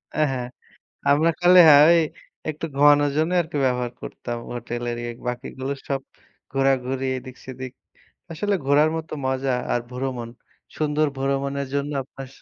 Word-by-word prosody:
অ্যা 155 - +3
হ্যাঁ। 125 -2 -3 0.6
আমরা 155 +4 +4
খালি 180 +1 +7
হ্যাঁ, 145 -1 +9
ওই 170 - +6 0.5
একটু 155 +1 -4
ঘুমানোর 145 0 +5
জন্য 160 +3 +1
আর - - -7
কি 150 - -2
ব্যবহার 125 -1 0
করতাম 120 -1 -6 0.2
হোটেলের 120 0 -4
ইয়া। 120 - -4 0.2
বাকিগুলো 130 +2 -4
সব 135 -1 -1 0.5
ঘোরাঘুরি, 135 -1 +1
এদিক-সেদিক। 130 0 -9 0.6
আসলে 205 +5 -1
ঘোরার 145 +3 +4
মতো 160 -1 -7
মজা 130 0 0 0.2
আর 120 - 0
ভ্রমণ। 125 -2 -4 0.5
সুন্দর 155 0 +1
ভ্রমণের 140 +1 -1
জন্য 140 +1 -1
আপনার 135 0 -10
135 Hz, 140 wpm, -23 LUFS, 130-150 Hz, 0.6 s, হ্যাঁ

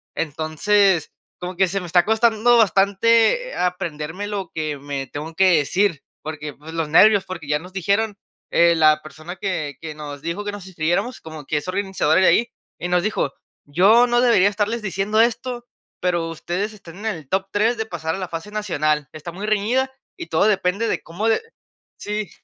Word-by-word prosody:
Entonces, 165 +4 +1 0.3
como 180 0 -6
que 190 -1 +4
se 195 +2 -1
me - - -7
está 175 +1 +3
costando 225 +2 +3
bastante 225 - +3
aprenderme 175 +1 -3
lo 195 -4 -4
que 155 -2 -2
me 140 -1 -5
tengo 155 +3 -7
que 185 -3 +5
decir 170 +2 +1 0.2
porque, 150 -1 -6
pues, 160 +3 -12
los 165 -2 -1
nervios, 200 +4 +6
porque 175 -5 -7
ya 150 0 +1
nos 180 +2 -13
dijeron, 200 +3 0 0.3
eh, 170 0 +5
la 155 -1 +4
persona 155 +4 -9
que 155 -7 -3
que 155 -2 -6
nos 145 -2 -8
dijo 170 +6 -4
que 205 - -2
nos 200 -3 -8
inscribiéramos, 185 +7 -1
como 155 -3 -9
que 150 - -1
es 150 - -4
organizadora 190 -3 +1
de - - +5
ahí 235 - +4 0.3
y 175 - -3
nos 180 0 +1
dijo: 200 -9 -1 0.3
"Yo 210 +11 +5
no 240 0 +2
debería 230 -6 +5
estarles 210 +3 -2
diciendo 200 +2 -1
esto, 240 +1 -1 0.3
pero 175 -2 0
ustedes 180 +6 -3
están 185 -3 -13
en 220 - -8
el 160 -10 -4
top 195 +1 -1
3 220 +4 +2
de 220 - -2
pasar 160 -4 -4
a - - -5
la 185 -2 -5
fase 165 +5 -6
nacional. 155 -8 -1
Está 155 +2 -8
muy 195 +4 -6
reñida 230 +6 +1 0.3
y 340 -2 -7
todo - - +2
depende 195 +2 +1
de - - -1
cómo 180 +7 -3
le". 225 - +2 0.6
Sí. 210 -1 -4
185 Hz, 190 wpm, -21 LUFS, 160-210 Hz, 0.6 s, nervios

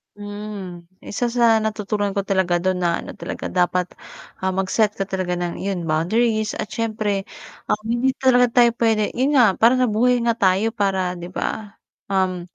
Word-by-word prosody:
Mm. 205 -4 -7 0.2
Isa 240 +3 -3
sa 230 -2 +3
natutunan 210 -1 -1
ko 200 - -2
talaga 185 -3 +1
do'n 185 +1 0
na 170 -1 +1
ano - - -9
talaga, - - -6
dapat, 180 0 +1 0.6
ah, 190 - +1
mag-set 195 +3 +1
ka 195 -2 -4
talaga 185 -2 -2
ng, 175 -1 -3
iyon, 185 -4 -3
boundaries. 215 +8 +1
At - - -3
siyempre, 215 -3 -2 0.5
um, - - +1
hindi 240 +3 +1
talaga 250 -2 +4
tayo 240 -1 +7
puwede, 220 -3 +2
'yon 265 +4 +1
nga, 215 -6 +5
parang 240 +3 +4
nabuhay 245 +3 +2
nga 230 - +2
tayo 195 0 +2
para, 190 -3 0
'di 175 +1 -8
ba, 210 +1 -5 0.3
um, 185 -2 0
205 Hz, 165 wpm, -21 LUFS, 185-225 Hz, 0.6 s, tayo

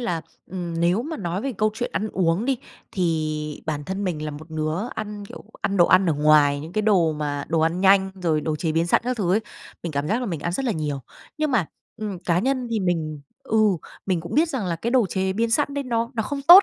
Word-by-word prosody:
là, 175 -9 -1 0.3
ừm, 175 -3 -4
nếu 175 +6 +3
mà 315 +4 -4
nói 175 0 -2
về 275 - -2
câu 215 0 +3
chuyện 240 - -3
ăn 205 +6 -1
uống 180 +3 +1
đi, 270 -2 +1 0.3
thì 155 -4 -1
bản 150 -2 -2
thân 190 +5 -3
mình 160 -5 -2
là 150 - -3
một 155 +3 -10
đứa 155 0 -1 0.2
ăn, 210 -1 -5
kiểu, - - -11 0.2
ăn 200 - 0
đồ 175 -2 +6
ăn 185 +1 +5
ở 165 - +3
ngoài, 145 -1 +4
những 160 +4 -8
cái 215 - 0
đồ 185 -7 +4
mà 145 -2 -3
đồ 165 - +2
ăn 165 +3 +1
nhanh, 195 0 +5
rồi 160 -3 +2
đồ 155 0 -1
chế 160 +1 -1
biến 165 +1 +2
sẵn - - +4
các 250 0 -1
thứ 185 -5 +1
ấy. 210 - +3 0.4
Mình 170 - -4
cảm 140 +1 -1
giác 225 +4 +1
là 250 - -2
mình 170 -7 -3
ăn 170 +3 -2
rất 265 - -1
là 240 - +1
nhiều. 150 -5 -2 0.4
Nhưng 305 -1 +1
mà, 225 - +2 0.3
ừm, 210 -4 -4
cá 175 -1 +1
nhân 255 +3 0
thì 225 -2 0
mình, 160 -5 -1 0.2
ừ, 220 - 0 0.5
mình 185 -4 +1
cũng 170 - -6
biết 320 +3 +4
rằng 265 - -2
là 170 -2 -1
cái 230 +8 -2
đồ 245 -4 +4
chế 190 0 -1
biến 225 +3 0
sẵn 280 +3 +1
đấy 285 -1 -2
nó 230 -2 -1
nó 225 - 0
không 275 +5 -4
tốt 350 +7 +11
185 Hz, 260 wpm, -24 LUFS, 160-220 Hz, 0.5 s, tốt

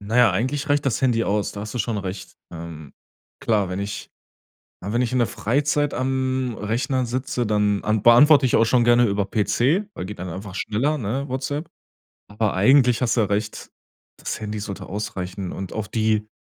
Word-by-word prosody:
Na 105 +4 -3
ja, 120 -4 +6
eigentlich 130 +10 -1
reicht 145 0 +2
das 125 - 0
Handy 120 -3 +2
aus, 105 0 -1
da 100 - -7
hast 105 0 -6
du - - -2
schon 115 -2 -1
recht. 95 -1 -7 0.2
Ähm, 80 -3 -9 0.5
klar, 105 -5 +1
wenn 90 +1 -4
ich 100 +1 -5 0.7
ja, 100 - -4
wenn 120 - +2
ich 125 0 -1
in 130 - +2
der 120 - +2
Freizeit 145 +4 0
am 130 -1 -1
Rechner 125 +5 -1
sitze, 125 0 -2
dann 105 -1 +1
an 105 -1 0
beantworte 140 +4 +7
ich 125 - +2
auch 115 - +4
schon 120 +1 +3
gerne 120 0 +5
über 100 -1 0
PC, 130 - +1
weil 90 - -6
geht 105 0 -8
dann 90 0 -5
einfach 95 +2 -7
schneller, 135 +11 0
ne, 135 +4 -3
WhatsApp. 145 +4 -3 0.6
Aber 105 0 -1
eigentlich 125 +4 +4
hast 120 - +1
du 115 - +3
ja 105 - +1
recht, 105 +2 -3 0.5
das - - -5
Handy 105 0 -4
sollte 100 -1 -6
ausreichen. 95 -3 -5
Und 95 -2 -6
auf 110 -2 -4
die 110 -1 0
110 Hz, 200 wpm, -23 LUFS, 100-130 Hz, 0.7 s, beantworte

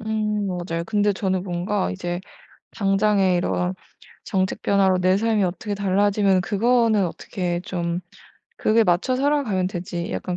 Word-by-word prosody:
음 215 -2 -1
맞아요. 175 -2 -3
근데 205 -1 +1
저는 190 -2 -1
뭔가 185 +2 -1
이제 175 -1 -4 0.5
당장에 195 -2 +2
이런 180 +1 -1 0.5
정책 190 -2 -1
변화로 190 -2 +3
내 185 +1 +3
삶이 220 0 +1
어떻게 195 +3 -3
달라지면 200 -1 +2
그거는 220 0 +2
어떻게 175 +1 -3
좀 175 -2 -3 0.6
그게 225 - +3
'맞춰 180 +9 +2
살아가면 265 -9 +1
되지.' 175 0 -4
약간 180 -1 -3
195 Hz, 295 characters per minute, -23 LUFS, 180-210 Hz, 0.6 s, 변화로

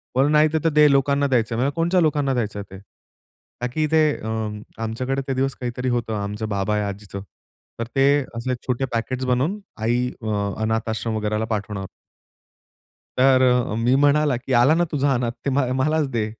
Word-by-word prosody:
पण 135 +3 +3
नाही, 150 0 +5
ते 160 - +2
तर - - +5
दे 150 -1 +5
लोकांना 140 +1 +2
द्यायचं 120 -4 +1
आहे." - - -2
म्हणल, 135 +2 +1
"कोणच्या 175 +2 +2
लोकांना 145 -4 +1
द्यायचं 110 -4 -2
आहे 100 -1 -9
ते?" - - -14 0.8
का 125 - 0
की 155 +2 +1
ते 160 -1 +5
अ, 110 - -8 0.6
आमच्याकडे 130 +5 -2
ते - - +1
दिवस 135 0 -1
काहीतरी 125 +1 -2
होतं. 120 -2 -1
आमचं 105 +2 -4
बाबा 105 +1 0
या 105 -1 -1
आजीचं. 100 0 -7 0.6
तर 115 - -1
ते 135 - +4 0.3
असे 120 +2 -2
छोटे 130 +1 0
पॅकेट्स 130 +3 -2
बनवून 130 +11 0 0.2
आई 120 +3 +1
अ, 105 -2 -1
अनाथ 110 0 -1
आश्रम 110 0 -2
वगैरेला 105 +1 -1
पाठवणं. 100 -1 -5 1.3
तर 130 0 +5
अ, 125 -3 +1
मी 120 +3 +2
म्हणाला, 145 0 +3
"की 130 +2 -4
आला 125 +5 +5
ना 175 - +2
तुझा 145 -2 +1
अनाथ 120 -2 0
ते - - +2
म 130 -2 +1
मलाच 155 +1 +1
दे. 115 -4 -1
125 Hz, 190 wpm, -22 LUFS, 110-140 Hz, 1.3 s, नाही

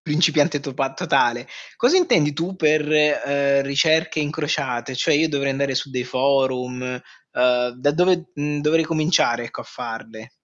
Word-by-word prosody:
principiante 150 -1 +1
topa 135 -1 -3
totale. 135 -7 0 0.3
Cosa 250 +10 +3
intendi 170 - +3
tu 170 +6 -4
per, 155 -3 +1
ehm, 140 -2 +2
ricerche 155 +3 +1
incrociate? 140 -5 -3
Cioè 130 - +1
io 160 +2 +2
dovrei 140 -2 -1
andare 135 0 -1
su 135 +1 -2
dei 125 -1 -3
forum, 130 -1 0 0.5
uhm, 125 0 +2
da 145 - +2
dove, 180 +2 +1
mhmm, 145 0 -3
dovrei 160 +2 +2
cominciare 155 -7 +1
ecco 115 - -8
a - - -18
farle? 115 -1 -9
145 Hz, 150 wpm, -21 LUFS, 130-155 Hz, 0.5 s, Cosa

